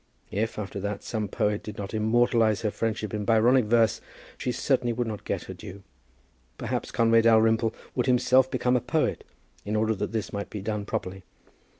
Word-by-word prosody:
If, 110 +3 -2
after 100 -1 -5
that, 100 +1 -4
some 110 -3 -3
poet 105 +1 -1
did 105 - -8
not 100 0 -6
immortalize 110 0 +2
her 105 - 0
friendship 110 -2 -3
in 105 -1 -2
Byronic 115 +3 +4
verse, 115 0 +3 0.3
she 125 - -2
certainly 125 -2 0
would 120 +1 -1
not 110 -2 -5
get - - -2
her - - -8
due. 95 +1 -10 0.7
Perhaps - - -3
Conway 115 0 +4
Dalrymple 115 0 +3 0.2
would 125 +1 -1
himself 130 +1 +4
become 125 0 +1
a 125 - +2
poet - - -1 0.4
in 105 +1 -3
order 110 +1 +2
that 100 - -3
this 110 -2 -3
might 100 0 -4
be 105 - -6
done 105 +1 -3
properly. 95 -1 -4
110 Hz, 185 wpm, -26 LUFS, 105-120 Hz, 0.7 s, Byronic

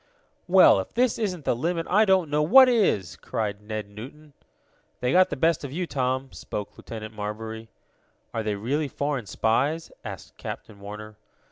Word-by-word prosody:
"Well, - - +7
if - - -6
this 245 0 +2
isn't 180 - -2
the - - +2
limit 165 +6 -1
I 210 +4 +4
don't 190 -6 +3
know 150 +1 +2
what 260 +12 +8
is!" 195 - +2
cried 105 -2 -3
Ned 110 0 -5
Newton. 135 +9 -11 0.7
"They 125 0 0
got 185 +3 +5
the - - -3
best 160 +2 +1
of 140 - -5
you, 180 +5 -2
Tom," 130 -2 -2
spoke 105 -1 -6
Lieutenant 110 -1 -8
Marbury. 110 +2 -6 0.6
"Are 115 - -1
they 105 -1 -1
really 140 +9 -1
foreign 140 -4 -3
spies?" 140 +12 0
asked - - -9
Captain 100 - -8
Warner. 105 +1 -9
130 Hz, 165 wpm, -26 LUFS, 110-165 Hz, 0.7 s, what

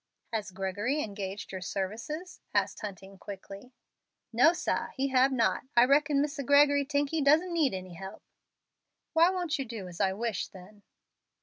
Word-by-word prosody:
"Has 215 -3 -2
Gregory 200 +10 -2
engaged 200 -1 -6
your 190 -1 -5
services?" 230 - -5
asked - - +1
Hunting, 195 -1 -8
quickly. 200 +5 -9 0.6
"No, 245 +8 +6
sah, 350 - -1
he 275 +1 0
hab 260 +1 +4
not. 240 -1 +1
I 240 - +8
reckon 285 +1 +3
Misser 295 0 -3
Gregory 285 +1 +4
tink 285 -1 0
he 320 -1 0
doesn't 315 +6 +4
need 305 - +2
any 185 -1 -7
help." 190 +4 -9 0.9
"Why 335 +1 +6
won't 350 -5 -1
you 270 - -2
do 220 -5 -7
as 175 -1 -6
I 190 - +2
wish, 215 -1 -2
then?" 195 +3 -14
240 Hz, 165 wpm, -29 LUFS, 195-290 Hz, 0.9 s, I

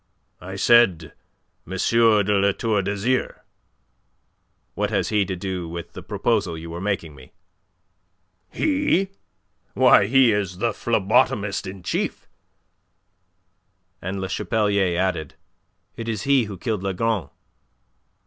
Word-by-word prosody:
"I 95 +2 -7
said 95 -7 +3 0.5
M. 95 - -7 0.5
de 105 0 +2
La 100 0 +2
Tour 110 -2 0
d'Azyr." 100 +6 -2 1.3
"What - - -1
has - - 0
he 105 -2 +2
to 95 - -4
do 90 -2 -4
with 85 0 -7
the - - -8
proposal 85 -2 -1
you 80 +1 -8
were 85 +1 -6
making 95 -6 -2
me?" 65 -3 -16 1.2
"He? 285 - +1 0.7
Why, 100 - +5
he 130 0 +5
is 100 -4 -2
the 115 +4 0
phlebotomist 105 -3 +1
in 95 -1 -8
chief." - - -3 1.7
And 95 +1 -4
Le 95 - -3
Chapelier 100 -3 0
added. 90 -6 -2 0.6
"It 115 0 -5
is 110 -4 -3
he 135 -4 +3
who 100 -2 -8
killed 110 +1 -3
Lagron." 100 - -1
100 Hz, 120 wpm, -23 LUFS, 90-115 Hz, 1.7 s, Why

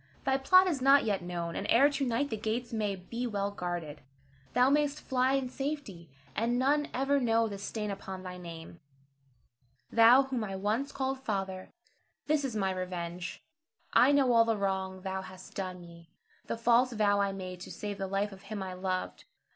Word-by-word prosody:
Thy 265 - +3
plot 370 +8 +6
is 320 -8 -1
not 275 +2 +6
yet 205 -3 0
known, 170 -1 -4
and 200 - -3
ere 265 +5 +6
to 285 -1 -1
night 255 +2 0
the - - 0
gates 225 +3 -3
may 210 -3 -1
be 235 +7 -5
well 200 -2 -2
guarded. 175 -6 -5 0.5
Thou 250 +1 +5
mayst 295 0 +2
fly 260 0 +1
in 270 -1 +1
safety, 260 - -5 0.3
and 235 +2 +1
none 290 +3 +2
ever 275 +2 +1
know 230 -2 +2
the 200 -2 -6
stain 210 +1 -4
upon 190 -1 -7
thy 180 -1 -6
name. 170 -1 -9 1.1
Thou 235 +4 +7
whom 260 -4 -3
I 195 -2 -4
once 215 +9 -1
called 265 0 -2
father, 195 -6 -3 0.6
this 300 -1 +1
is 260 -5 -3
my 195 -2 +1
revenge. 180 -1 -5 0.5
I 260 - +6
know 275 -3 +4
all 230 -1 +7
the 225 -1 0
wrong 190 -1 -2
thou 190 -1 -3
hast 185 0 -12
done 185 -2 -4
me, 170 -1 -14 0.4
the - - -2
false 240 +2 +3
vow 205 -2 +2
I 200 0 +1
made 185 -2 -7
to - - -9
save 205 -1 -5
the 195 - -2
life 200 +2 -1
of 195 0 -12
him 210 -2 -5
I 185 -1 -5
loved. 185 0 -3
210 Hz, 190 wpm, -30 LUFS, 190-255 Hz, 1.1 s, Thou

